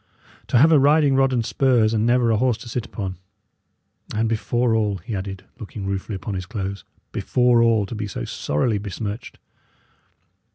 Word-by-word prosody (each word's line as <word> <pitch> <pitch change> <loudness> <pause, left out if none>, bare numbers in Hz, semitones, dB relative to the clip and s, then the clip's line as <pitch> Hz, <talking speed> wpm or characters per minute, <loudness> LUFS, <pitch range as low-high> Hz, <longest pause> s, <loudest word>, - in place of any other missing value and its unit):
To - - +2
have 155 +7 +6
a 155 - +6
riding 145 0 +4
rod 135 0 +3
and 120 -3 0
spurs, 120 -5 +2
and 110 +1 +1
never 120 -1 +3
a 110 - +2
horse 125 -1 +1
to - - -11
sit 120 0 -4
upon! 95 -3 -5 1.0
And 110 +1 +1
before 115 +1 0
all," 105 -3 +1
he 100 +5 -6
added, 95 0 -6
looking 100 -1 -7
ruefully 100 +2 -3
upon 100 +2 -5
his 90 -1 -4
clothes 100 -3 -4 0.3
"before 125 -1 +2
all, 115 -3 +3
to 95 - -8
be 105 -1 -4
so - - -5
sorrily 100 +9 -1
besmirched!" 105 +2 -6
110 Hz, 175 wpm, -22 LUFS, 100-125 Hz, 1.0 s, have